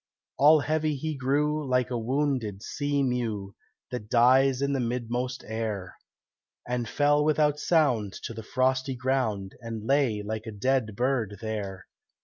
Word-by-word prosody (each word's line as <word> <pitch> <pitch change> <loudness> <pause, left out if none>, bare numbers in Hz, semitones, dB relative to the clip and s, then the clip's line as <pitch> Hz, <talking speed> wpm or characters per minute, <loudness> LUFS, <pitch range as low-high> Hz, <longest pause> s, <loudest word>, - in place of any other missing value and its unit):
All 150 +2 +7
heavy 155 +1 0
he 155 +3 -3
grew, 150 +3 0
like 125 -2 0
a 120 - 0
wounded 125 -5 -1
sea 145 0 -1
mew 115 -6 -2 0.4
That 105 -4 -5
dies 130 +2 +5
in 140 0 0
the 135 - 0
midmost 125 +1 -2
air, 110 -4 -4 0.7
And 120 -2 -2
fell 145 0 +3
without 150 -1 +2
sound 125 - +2
to - - -5
the 110 - -7
frosty 130 +3 0
ground, 125 -7 -1
And 115 -2 -6
lay 130 -6 +2
like 110 +2 -5
a - - -4
dead 110 0 0
bird 120 -4 0
there. 100 -4 -5
125 Hz, 145 wpm, -27 LUFS, 110-140 Hz, 0.7 s, All